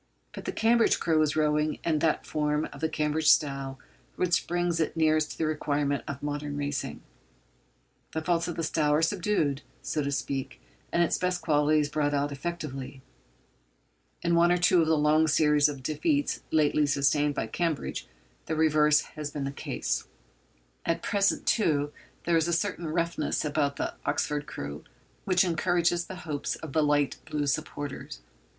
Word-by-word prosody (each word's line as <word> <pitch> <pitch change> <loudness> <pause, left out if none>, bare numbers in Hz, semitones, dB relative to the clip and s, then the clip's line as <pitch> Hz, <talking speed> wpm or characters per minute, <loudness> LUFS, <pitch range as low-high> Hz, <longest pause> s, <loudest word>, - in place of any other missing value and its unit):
But - - -8
the - - -1
Cambridge 230 +1 +3
crew 160 -2 +2
is 155 -1 +1
rowing 150 0 +1
in 155 -2 +1
that 160 0 +1
form 150 0 0
of - - -11
the 160 - +1
Cambridge 155 0 +1
style 135 -2 +2 0.4
which 180 -1 +1
brings 175 -1 0
it 160 +1 -1
nearest 155 -1 +2
to - - -14
the 160 - 0
requirements 145 -3 -1
of 140 0 -6
modern 145 0 -3
racing. 145 -2 -3 1.1
The 160 - -2
faults 170 0 +1
of 175 - -4
the 165 - -2
style 155 -1 +1
are 155 - +2
subdued, 165 -6 0 0.2
so 155 - -1
to 140 0 -2
speak, 135 -1 -3 0.3
and 170 - +3
its 170 - 0
best 180 -1 -1
qualities 150 -1 +3
brought 145 0 0
out 145 +1 0
effectively. 140 -4 -5 1.2
In 170 0 +1
one 170 +1 +5
or 175 - +4
two 175 0 +4
of 160 - +1
the 160 -1 +3
long 155 +2 +4
series 150 -1 +4
of 140 -3 -7
defeats 285 - 0
lately 150 -1 +3
sustained 145 +1 +2
by - - -1
Cambridge 160 +6 -2 0.4
the 160 - -1
reverse 150 -1 +4
has 150 -1 -7
been 145 -1 -4
the 135 - -2
case. 60 - -3 0.8
At 165 - -1
present, 200 -2 +1
too, 150 -9 +1 0.3
there 170 -1 +2
is 165 0 +1
a 170 - 0
certain 175 -1 -1
roughness 170 0 -1
about 145 -1 0
the - - -3
Oxford 150 0 -1
crew 70 - -6 0.4
which 185 -1 +4
encourages 175 0 +1
the 190 - -7
hopes 145 -3 -2
of 155 -4 -9
the 155 - +3
light 145 -1 +2
blue 150 -1 -1
supporters. 145 - -4
155 Hz, 170 wpm, -28 LUFS, 145-170 Hz, 1.2 s, one